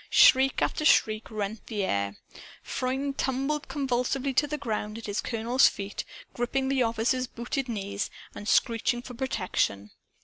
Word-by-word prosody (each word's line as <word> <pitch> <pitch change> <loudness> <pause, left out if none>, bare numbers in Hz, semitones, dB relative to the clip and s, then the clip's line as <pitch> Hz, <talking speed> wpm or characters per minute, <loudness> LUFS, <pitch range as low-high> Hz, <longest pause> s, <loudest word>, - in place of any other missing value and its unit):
Shriek 265 +1 +6
after - - -1
shriek 215 -7 +3
rent 215 0 -4
the 210 -4 -2
air. 100 - -1 0.5
Freund 270 +2 -2
tumbled 275 +3 -1
convulsively 270 0 -1
to 295 +4 +3
the 300 +1 -3
ground 215 -4 -3
at 230 - -8
his 205 0 -1
colonel's 235 +3 +3
feet, 200 0 -4 0.3
gripping 265 +2 -1
the 270 -1 +2
officer's 235 +2 +1
booted 250 +3 -3
knees 200 -3 -3 0.2
and 205 - -8
screeching 240 +1 +2
for 250 - -8
protection. 185 - -1
240 Hz, 145 wpm, -28 LUFS, 210-265 Hz, 0.5 s, Shriek